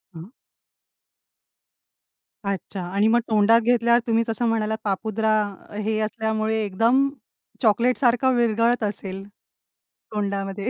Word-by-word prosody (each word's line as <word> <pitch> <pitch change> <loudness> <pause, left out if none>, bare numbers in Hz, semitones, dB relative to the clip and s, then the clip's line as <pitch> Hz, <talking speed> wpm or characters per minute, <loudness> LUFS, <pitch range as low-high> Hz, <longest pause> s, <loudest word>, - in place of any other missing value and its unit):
हं. 170 +8 -10 2.1
अच्छा. 195 -1 -4
आणि 200 +4 +1
मग 235 +2 +4
तोंडात 220 +2 +4
घेतल्यावर 235 0 +3
तुम्ही 230 0 +2
जसं 225 +2 -2
म्हणालात 220 -1 -1
पापुद्रा 215 +2 -1 0.4
अ, - - -12
हे 215 +1 -1
असल्यामुळे, 220 0 -1
एकदम 230 +8 +2 0.5
चॉकलेट 235 +2 +2
सारखं 255 0 +2
विरघळत 235 0 +1
असेल, 195 -2 -4 0.9
तोंडामध्ये? 200 0 -3
220 Hz, 105 wpm, -23 LUFS, 205-235 Hz, 2.1 s, मग